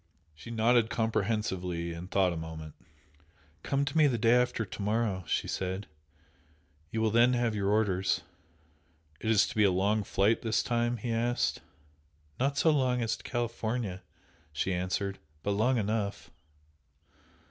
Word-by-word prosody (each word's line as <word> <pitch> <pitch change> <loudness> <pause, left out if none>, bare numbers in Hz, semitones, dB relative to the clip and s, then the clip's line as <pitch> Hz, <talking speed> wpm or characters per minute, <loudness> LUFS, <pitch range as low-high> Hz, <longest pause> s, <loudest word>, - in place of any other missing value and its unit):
She 75 +10 -12
nodded 115 0 +3
comprehensively, 100 -7 -1
and 85 +2 -8
thought 95 -3 +2
a - - -5
moment. 80 -1 -7 0.9
"Come 140 0 0
to 145 - -4
me 155 -2 +6
the 125 -4 +1
day 115 +1 +4
after 125 -2 +2
to 100 - -8
morrow" 105 -2 0
she - - 0
said 95 +2 -3 1.0
"You 110 - -2
will 110 -1 +2
then 120 +3 +5
have 120 -2 +1
your 100 -2 0
orders." 100 -3 +1 1.0
"Is 110 -2 +3
it - - -6
to - - -8
be 105 - +4
a 100 - +5
long 100 +4 +1
flight 100 +3 +2
this 115 -1 +1
time?" 120 0 0
he 115 +2 -4
asked. 120 +2 0 0.8
"Not 140 +2 +1
so 160 - +4
long 130 -4 +1
as 115 - 0
to - - -14
California!" 115 -5 -3 0.5
she 75 +5 -1
answered 95 +2 -2 0.2
"But 100 - 0
long 115 +6 +2
enough!" 105 -1 -2
110 Hz, 155 wpm, -30 LUFS, 95-120 Hz, 1.0 s, me